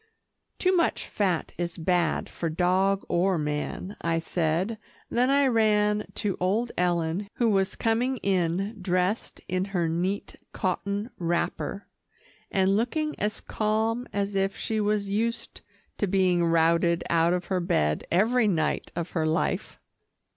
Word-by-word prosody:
"Too 370 0 +2
much 335 -2 +1
fat 185 -5 -1
is 170 -1 -3
bad 175 0 +1
for 165 - -4
dog 185 +4 +2
or 180 +1 +2
man," 150 +6 -3
I 165 0 +1
said, 170 +6 -1 0.3
then 245 +2 +2
I 280 0 +4
ran 210 -3 +2
to 205 -3 -1
old 210 +7 0
Ellen 175 +2 0
who 235 -2 +2
was 195 -1 +1
coming 240 +4 +1
in 195 +2 0
dressed 180 +4 0
in 185 +1 0
her 180 -4 -1
neat 180 +5 -2 0.2
cotton 200 +4 -2
wrapper, 175 +3 -2 0.6
and 195 0 +2
looking 300 +8 0
as 210 0 -2
calm 220 +3 -1
as 200 0 -1
if 195 0 0
she 220 -1 -1
was 210 -1 0
used 225 +4 -2 0.4
to 205 - +1
being 180 -2 +2
routed 170 +1 +3
out 170 +1 +3
of 180 -1 -1
her 185 - +2
bed 75 - +1
every 220 +6 +3
night 160 -6 0
of 170 0 -3
her 160 -2 0
life. 160 +3 -1
190 Hz, 140 wpm, -27 LUFS, 170-215 Hz, 0.6 s, I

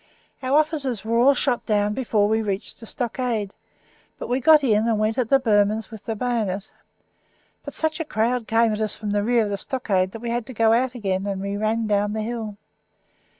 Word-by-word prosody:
Our 265 +2 +2
officers 285 -8 0
were 230 +1 +1
all 275 +3 +5
shot 250 -2 0
down 210 -1 +1
before 215 -4 +1
we 220 +1 +1
reached 200 -1 -4
the 225 - -10
stockade, 235 -4 -2 0.6
but - - -6
we 250 +2 +1
got 305 +2 +6
in, 220 -3 +2
and 225 -2 +2
went 215 +3 0
at 240 -3 0
the 275 - +6
Burmans 215 -2 +1
with 220 -1 -10
the 225 - -2
bayonet. 215 -4 -2 0.9
But - - -7
such 315 0 -1
a - - 0
crowd 235 -2 -1
came 225 0 +3
at 210 - -3
us 215 -1 -2
from 210 -1 -4
the 205 0 +1
rear 235 +1 +3
of 205 - -3
the 200 - -1
stockade 195 -5 -1
that 225 - -7
we 235 -1 -3
had 240 -1 -2
to 260 - -8
go 225 0 +4
out 250 +2 +1
again, 195 -4 -2
and 195 -1 -2
we 200 +1 -3
ran 220 +2 0
down 205 0 +1
the 215 0 -2
hill. 220 -2 -5
225 Hz, 220 wpm, -23 LUFS, 210-245 Hz, 0.9 s, got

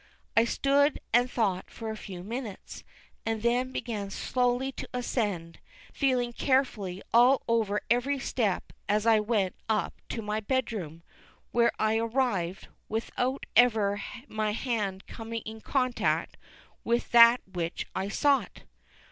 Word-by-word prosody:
I 230 - +5
stood 280 +4 +2
and 245 +1 +4
thought 200 -7 -1
for 225 -1 -6
a - - -5
few 185 -4 -8
minutes, 225 -1 -6 0.4
and 225 -1 -2
then 245 +2 +1
began 215 -6 -4
slowly 250 +5 0
to - - -8
ascend, 205 -9 -2 0.3
feeling 250 -3 +1
carefully 225 -9 0
all 245 +3 +6
over 220 -3 +1
every 245 +4 +2
step 225 -7 -1 0.2
as 210 +1 +2
I 225 -1 +5
went 210 -4 0 0.2
up 215 -2 +1 0.2
to 225 - -4
my 210 +1 -1
bed 260 +2 -1
room, 165 -5 -6 0.5
where 235 0 +4
I 220 0 +2
arrived, 225 -7 -1 0.2
without 245 +4 -2
ever 215 -4 +4 0.3
my 215 -1 -1
hand 210 -5 -2
coming 225 0 -6
in 220 0 -7
contact 255 -1 0 0.5
with 235 +1 0
that 235 +1 +8
which 170 -1 -3
I 190 +1 -2
sought. 280 +6 +1
230 Hz, 135 wpm, -28 LUFS, 205-245 Hz, 0.5 s, that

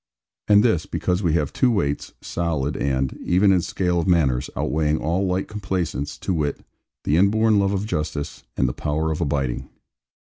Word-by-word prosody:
And 105 0 +6
this, 110 -10 +2
because 90 +1 -1
we 85 -5 +1
have 75 -4 0
two 130 - +3
weights, 75 -11 -1
solid 80 -4 -2
and 65 -1 -1
(even 95 +3 +4
in 90 -2 +3
scale 90 0 0
of 85 - -1
manners) 70 -7 +2
outweighing 75 0 +1
all 90 +6 0
light 90 +1 -1
complaisance; 90 - -3
to 95 - -2
wit, 75 -4 -2 0.4
the 75 - +2
inborn 105 +3 +4
love 100 0 +2
of 100 0 -1
justice, 75 -7 -3 0.2
and 65 - +2
the 60 - -2
power 80 +2 -1
of 80 - -3
abiding. 70 -4 -1
85 Hz, 175 wpm, -23 LUFS, 75-95 Hz, 0.4 s, And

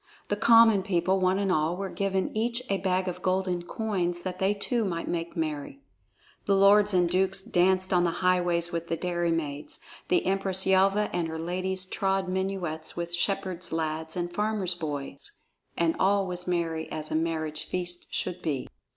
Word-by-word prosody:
The 205 - +1
common 225 -1 +6
people, 185 0 +1
one 185 0 +2
and 195 -1 0
all, 160 +1 +1
were 195 0 -3
given 195 0 -1
each 235 +3 -1
a 195 - +1
bag 185 0 0
of 180 0 -4
golden 185 -1 0
coins 175 -3 -2
that 185 -1 -5
they 195 +2 +2
too 230 +3 -1
might 170 -4 -3
make 170 +1 -3
merry. 145 -3 -4 0.6
The 200 - +3
lords 205 +1 +5
and 180 -2 +3
dukes 190 +2 +1
danced 185 +1 +2
on 175 -1 +4
the 175 - +2 0.2
highways 175 -2 +2
with 170 -1 -3
the 165 - -1
dairymaids; 165 -5 -2 0.3
the 180 - +2
Empress 190 0 +1
Yelva 195 +2 +3
and 170 -2 0
her 160 0 -5
ladies 185 +3 -2
trod 195 0 -1
minuets 185 -4 -3
with 170 0 -4
shepherd 185 -1 -1
lads 160 +1 -3
and 175 0 -3
farmer 210 +1 -1
boys, 145 -3 -5 0.5
and 165 -1 +2
all 195 +1 +3
was 180 -1 -4
merry 165 -2 -1
as 155 -1 -5
a - - 0
marriage 160 -1 -1
feast 175 -1 -3
should 180 -1 -3
be. 145 -5 -2
180 Hz, 175 wpm, -27 LUFS, 170-195 Hz, 0.6 s, common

